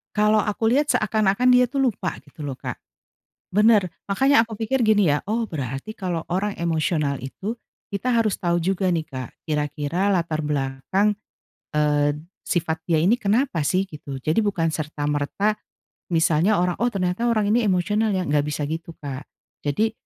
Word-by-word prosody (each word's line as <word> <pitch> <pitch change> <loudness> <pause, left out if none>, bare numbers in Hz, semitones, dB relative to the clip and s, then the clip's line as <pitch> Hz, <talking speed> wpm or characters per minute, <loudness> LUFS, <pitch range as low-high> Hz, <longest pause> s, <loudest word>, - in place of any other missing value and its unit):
Kalo 210 0 +4
aku 220 +1 0
lihat 290 +4 +3
seakan-akan 215 +2 +2
dia 250 0 +6
tuh 275 +3 -1
lupa 185 -5 -4
gitu 150 +1 -11
loh, 135 -2 -4
Kak, - - -5 0.7
bener 210 -2 +4 0.2
makanya 265 +5 +4
aku 225 - -7
pikir 225 +5 -1
gini 210 -7 +4
ya, 145 - +2
"Oh 225 +3 0
berarti 135 - -5
kalo 175 -4 -2
orang 200 +3 0
emosional 155 -4 0
itu, 190 - -5 0.4
kita 200 +5 -2
harus 220 -4 +1
tahu 175 -1 +1
juga 190 +2 0
nih, 165 -3 0
Kak, 130 -5 -6
kira-kira 150 +4 -1
latar 165 -4 0
belakang, 150 +8 0 0.6
eee, 150 -1 +2 0.3
sifat 160 -2 -1
dia 165 -2 +2
ini 185 +8 +4
kenapa 215 - +1
sih?" 185 +6 +1
Gitu. 145 -5 -7
Jadi 155 - +1
bukan 185 -6 0
serta-merta 150 +6 -1 0.6
misalnya 165 +5 +3
orang, 180 -1 +1
"Oh 240 - +3
ternyata 185 +4 -1
orang 215 -3 +2
ini 235 +2 +3
emosional 210 +4 +1
ya," 185 - 0
nggak 145 0 +2
bisa 150 0 -3
gitu 165 +1 -5
Kak, 140 -1 -7 0.4
jadi 215 +10 +1
180 Hz, 160 wpm, -23 LUFS, 150-210 Hz, 0.7 s, dia